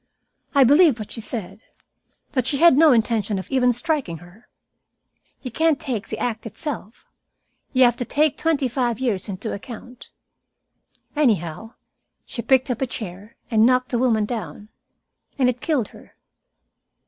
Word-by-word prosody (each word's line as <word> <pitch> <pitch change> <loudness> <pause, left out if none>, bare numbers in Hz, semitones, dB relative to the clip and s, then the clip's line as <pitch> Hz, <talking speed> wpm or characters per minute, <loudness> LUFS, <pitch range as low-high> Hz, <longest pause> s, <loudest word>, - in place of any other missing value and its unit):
I 280 - +7
believe 290 +1 +5
what 215 -2 -8
she 225 - -4
said 220 -2 -5 0.7
that 255 -4 0
she 280 - +1
had 335 -1 +6
no 310 +1 +6
intention 220 -4 +1
even 255 -2 +3
of 245 - +2
striking 255 - -2
her. 175 +7 -17 1.0
You 255 - -5
can't 320 +3 +2
take 225 -5 -4
the - - -5
act 225 -2 -3
itself. 225 -1 -7 0.7
You 260 -2 +4
have 240 -1 +4
to 245 - -3
take 300 +2 +1
twenty 310 -5 0
five 240 -2 -1
years 220 -7 -1
into 200 +3 -4
account. 245 +3 -10 1.1
Anyhow, 220 - 0 0.5
she 235 - -4
picked 260 +1 +2
up 245 - -4
a 265 - +1
chair 205 -2 -7 0.2
and 220 -1 +4
knocked 255 +1 +3
the 240 - 0
woman 225 -4 +2
down. 215 -2 -6 0.7
And 255 -2 +3
it 245 0 -12
killed 285 -9 0
her." - - -17
245 Hz, 155 wpm, -22 LUFS, 220-265 Hz, 1.1 s, I